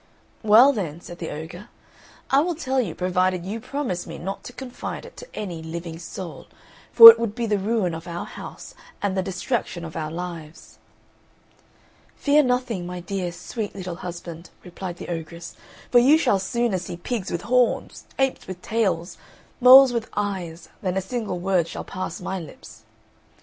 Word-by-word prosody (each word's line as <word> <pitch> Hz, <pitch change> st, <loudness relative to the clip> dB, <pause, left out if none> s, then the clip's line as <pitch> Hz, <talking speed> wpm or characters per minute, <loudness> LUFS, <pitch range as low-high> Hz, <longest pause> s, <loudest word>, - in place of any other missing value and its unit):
"Well 230 Hz, +6 st, +7 dB
then," 170 Hz, -, -4 dB
said 175 Hz, 0 st, -11 dB
the 165 Hz, -, -5 dB
ogre, 170 Hz, +8 st, -8 dB, 0.6 s
"I 270 Hz, -, +6 dB
will 340 Hz, +3 st, 0 dB
tell 265 Hz, -4 st, 0 dB
you 180 Hz, -10 st, -4 dB
provided 185 Hz, 0 st, 0 dB
you 210 Hz, +4 st, -4 dB
promise 235 Hz, -8 st, -4 dB
me 165 Hz, 0 st, -7 dB
not 195 Hz, +3 st, -6 dB
to -, -, -7 dB
confide 255 Hz, -, -7 dB
it -, -, -13 dB
to -, -, -10 dB
any 175 Hz, -6 st, -5 dB
living 165 Hz, 0 st, -6 dB
soul, 175 Hz, +1 st, -8 dB, 0.4 s
for 230 Hz, -1 st, +13 dB
it 230 Hz, -, -4 dB
would 230 Hz, -2 st, -2 dB
be 235 Hz, -, -2 dB
the 210 Hz, -2 st, 0 dB
ruin 200 Hz, -3 st, 0 dB
of 165 Hz, +1 st, -7 dB
our 170 Hz, 0 st, -5 dB
house -, -, -10 dB, 0.3 s
and 200 Hz, -2 st, -1 dB
the 190 Hz, -, +1 dB
destruction 185 Hz, -1 st, -3 dB
of 160 Hz, -, -9 dB
our 155 Hz, -1 st, -3 dB
lives." 165 Hz, -2 st, -8 dB, 1.4 s
"Fear 295 Hz, +1 st, +4 dB
nothing, 250 Hz, -8 st, -1 dB
my 180 Hz, 0 st, -6 dB
dear, 180 Hz, 0 st, -3 dB
sweet 210 Hz, +4 st, -6 dB
little 180 Hz, -3 st, -6 dB
husband," 170 Hz, -1 st, -8 dB
replied 180 Hz, 0 st, -7 dB
the -, -, -8 dB
ogress; 170 Hz, 0 st, -6 dB, 0.4 s
"for 245 Hz, -, +7 dB
you 275 Hz, +6 st, +6 dB
shall 205 Hz, -11 st, +2 dB
sooner 235 Hz, 0 st, -1 dB
see 175 Hz, 0 st, -7 dB
pigs 205 Hz, +3 st, -4 dB
with 175 Hz, 0 st, -3 dB
horns, 250 Hz, 0 st, +1 dB
apes 270 Hz, -1 st, 0 dB
with 185 Hz, -1 st, -7 dB
tails, 190 Hz, -6 st, -1 dB, 0.4 s
moles 260 Hz, 0 st, +9 dB
with 230 Hz, -2 st, -2 dB
eyes, 185 Hz, -5 st, -3 dB
than 185 Hz, -1 st, -1 dB
a -, -, +3 dB
single 215 Hz, -1 st, -4 dB
word 180 Hz, -2 st, +1 dB
shall -, -, -6 dB
pass 185 Hz, -2 st, -5 dB
my 190 Hz, -, -4 dB
lips." 160 Hz, -4 st, -12 dB
190 Hz, 175 wpm, -23 LUFS, 175-235 Hz, 1.4 s, for